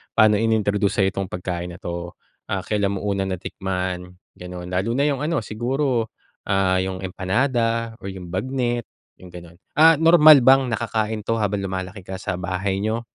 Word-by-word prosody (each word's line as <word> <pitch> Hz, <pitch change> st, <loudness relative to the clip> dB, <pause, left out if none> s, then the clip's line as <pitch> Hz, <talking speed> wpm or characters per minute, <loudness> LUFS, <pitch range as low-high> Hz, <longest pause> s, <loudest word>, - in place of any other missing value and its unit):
paano 105 Hz, -1 st, +5 dB
ini-introduce 105 Hz, -3 st, +1 dB
sa'yo 95 Hz, -, +3 dB
'tong 95 Hz, +1 st, -3 dB
pagkain 90 Hz, -1 st, -5 dB
na 85 Hz, -, -10 dB
'to, 85 Hz, 0 st, -5 dB, 0.3 s
ah, 95 Hz, -, -2 dB
kailan 100 Hz, +1 st, -1 dB
mo 95 Hz, -, -4 dB
una 100 Hz, -1 st, -1 dB
natikman, 90 Hz, -1 st, -4 dB, 0.3 s
ganon. 90 Hz, 0 st, -8 dB
Lalo 95 Hz, +6 st, -1 dB
na 140 Hz, +3 st, +1 dB
'yong 140 Hz, -, -1 dB
ano 165 Hz, -3 st, 0 dB
siguro, 120 Hz, +2 st, -1 dB, 0.4 s
ah, 95 Hz, -1 st, +2 dB
'yong 95 Hz, 0 st, -3 dB
empanada 115 Hz, +4 st, -1 dB
o -, -, -12 dB
yung 95 Hz, -2 st, -8 dB
bagnet 120 Hz, +3 st, -2 dB, 0.3 s
'yong, 90 Hz, -1 st, -14 dB
gano'n. 85 Hz, -1 st, -11 dB, 0.2 s
Ah, 160 Hz, +1 st, +7 dB
normal 155 Hz, -2 st, +8 dB
bang 135 Hz, -1 st, +5 dB
nakakain 110 Hz, 0 st, -1 dB
'to 115 Hz, -, 0 dB
habang 100 Hz, -1 st, -1 dB
lumalaki 95 Hz, 0 st, -5 dB
ka 95 Hz, -, -6 dB
sa 90 Hz, -, -3 dB
bahay 95 Hz, +2 st, -2 dB
nyo 110 Hz, +3 st, -1 dB
100 Hz, 170 wpm, -22 LUFS, 95-115 Hz, 0.4 s, normal